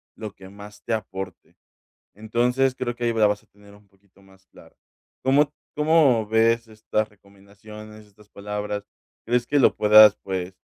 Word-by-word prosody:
lo 105 -2 -8
que 95 0 -14
más 105 +1 -14
te 115 - -3
aporte. 95 -4 -7 0.6
Entonces, 125 +5 0
creo 120 -2 -4
que 120 0 -4
ahí 115 - 0
la 110 -2 +3
vas 105 0 -2
a - - -31
tener 100 0 -20
un 100 0 -21
poquito 95 0 -29
más 95 0 -23
claro. - - -19 0.5
¿Cómo 145 +2 +3 0.2
cómo 150 -7 +3
ves 115 +1 +2
estas 110 0 -3
recomendaciones, 105 +2 -15
estas 105 0 -23
palabras? 105 0 -5 0.4
¿Crees 120 +1 0
que 145 - 0
lo - - +4
puedas, 105 0 +7
pues, 95 -1 -5
105 Hz, 165 wpm, -23 LUFS, 100-115 Hz, 0.6 s, puedas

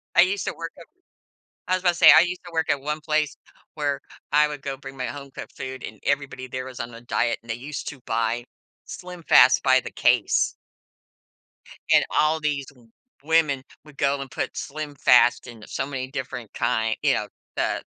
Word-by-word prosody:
I - - +8
used 190 +1 +1
to - - -2
work 165 0 -6
at 170 - -12 0.8
I 185 - +3
was 185 - -4
about 180 - +5
to 175 - +1
say, 170 -3 +9
I 160 +2 +9
used 180 +1 -2
to 175 - -10
work 160 -1 0
at 140 -1 -1
one 150 +2 -2
place 155 -1 0 0.4
where 145 -2 -1 0.3
I 150 +1 +5
would 145 -2 -7
go 135 -1 -3
bring 135 0 -11
my 130 - -2
home-cooked 140 -1 -8
food, 130 0 -6
and - - -8
everybody 140 -2 -2
there 130 0 -5
was 130 -2 -9
on 115 0 -5
a 115 - -11
diet, 120 -1 0
and 115 - -19
they - - -2
used 135 +4 -7
to 140 - -10
buy, 115 +1 0 0.4
SlimFast 175 -7 +4
by 130 -1 +5
the - - -8
case. - - +2 1.4
And - - +6
all 155 +1 +2
these 145 -3 -1
w 125 -5 -18 0.3
women 155 -4 +2 0.2
would 150 -2 -16
go 140 0 +1
and 135 - -7
put - - -3
SlimFast 140 -5 +2
in 115 -3 -11
so - - -3
many 135 -2 -4
different 130 -5 -6
kind 115 -2 0
you - - +3
know, - - -1 0.3
the - - 0
140 Hz, 195 wpm, -24 LUFS, 130-155 Hz, 1.4 s, say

